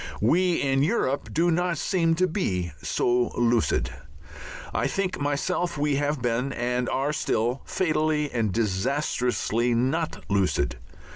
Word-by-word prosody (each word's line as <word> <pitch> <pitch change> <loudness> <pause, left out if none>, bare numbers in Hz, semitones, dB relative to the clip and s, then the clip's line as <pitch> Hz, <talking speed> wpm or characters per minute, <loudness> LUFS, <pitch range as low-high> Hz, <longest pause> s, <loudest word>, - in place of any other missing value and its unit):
We 175 - +3
in 135 -1 +1
Europe 145 - 0
do 170 +2 +2
not 175 0 0
seem 165 -4 +1
to 185 +3 +2
be 90 - -1
so 120 0 +1
lucid. 120 -1 +1 0.8
I - - +1
think 190 -1 -2
myself 145 +4 -1
we 145 -1 +1
have 145 -2 -1
been, 120 +3 0
and 125 +1 -1
are 140 +3 0
still, 120 -3 0
fatally 155 -4 0
and 115 -4 0
disastrously 120 +2 0
not 145 +7 -1
lucid. 95 -7 +1
140 Hz, 130 wpm, -26 LUFS, 120-160 Hz, 0.8 s, We